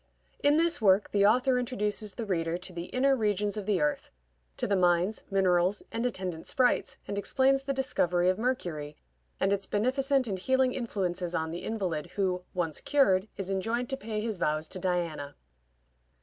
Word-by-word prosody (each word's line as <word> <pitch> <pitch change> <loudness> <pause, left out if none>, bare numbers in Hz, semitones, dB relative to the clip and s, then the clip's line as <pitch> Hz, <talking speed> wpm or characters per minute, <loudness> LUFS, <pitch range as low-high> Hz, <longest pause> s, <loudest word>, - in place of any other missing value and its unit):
In 290 +1 +4
this 335 -4 +2
work 195 -1 +4
the 200 0 +4
author 250 +3 +3
introduces 215 -4 -2
the 230 - -4
reader 165 -4 -1
to 180 +1 -8
the 170 0 -5
inner 270 +6 +2
regions 210 -3 0
of 210 -2 -5
the 205 -3 +2
earth; 150 0 -1 0.5
to - - -1
the 205 - +1
mines, 180 +3 +2
minerals, 185 -1 +2
and 230 - -2
attendant 185 -8 -4
sprites, 250 -2 +1
and 200 - -2
explains 270 +5 +2
the 275 0 -3
discovery 180 -10 +1
of 185 +2 +2
mercury, 170 - -2 0.4
and 195 +1 +2
its 195 -1 -2
beneficent 265 +5 +1
and 195 -3 -3
healing 260 +4 +2
influences 185 -7 -2
on 160 -2 -1
the 170 - -6
invalid, 180 -8 -2
who, 185 -3 0
once 165 -4 -2
cured, 205 -9 +3
is 195 -1 -3
enjoined 225 +6 -1
to - - +1
pay 215 -2 -4
his 220 -2 -3
vows 155 -1 0
to 185 - -4
Diana. 170 -6 -2
200 Hz, 175 wpm, -29 LUFS, 180-245 Hz, 0.5 s, In